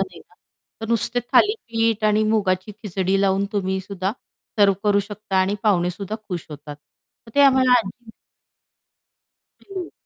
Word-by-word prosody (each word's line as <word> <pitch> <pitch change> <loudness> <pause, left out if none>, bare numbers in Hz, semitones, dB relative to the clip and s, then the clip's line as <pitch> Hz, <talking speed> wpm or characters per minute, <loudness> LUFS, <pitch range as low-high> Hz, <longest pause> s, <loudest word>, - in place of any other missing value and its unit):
नाही 185 -3 -4
ना - - -23 0.5
तर 225 - -4
नुसते 235 +2 0
थालीपीठ 230 - +2
आणि 215 0 +3
मुगाची 210 -2 0
खिचडी 195 -1 0
लावून 195 0 +2
तुम्ही 190 -2 -1
सुद्धा 190 0 -3 0.5
सर्व्ह 200 -2 +5
करू 205 -1 +3
शकता 205 -1 -5
आणि 190 +2 +1
पाहुणे 180 -5 +2
सुद्धा 200 +4 -5
खुश 175 -4 -5
होतात. 145 0 -9
तर 195 +8 -24
ते 285 - +4
आम्हाला 265 -2 +5
आजी 225 +2 -7 1.5
हं. 375 -3 -7
205 Hz, 145 wpm, -22 LUFS, 190-225 Hz, 1.5 s, सर्व्ह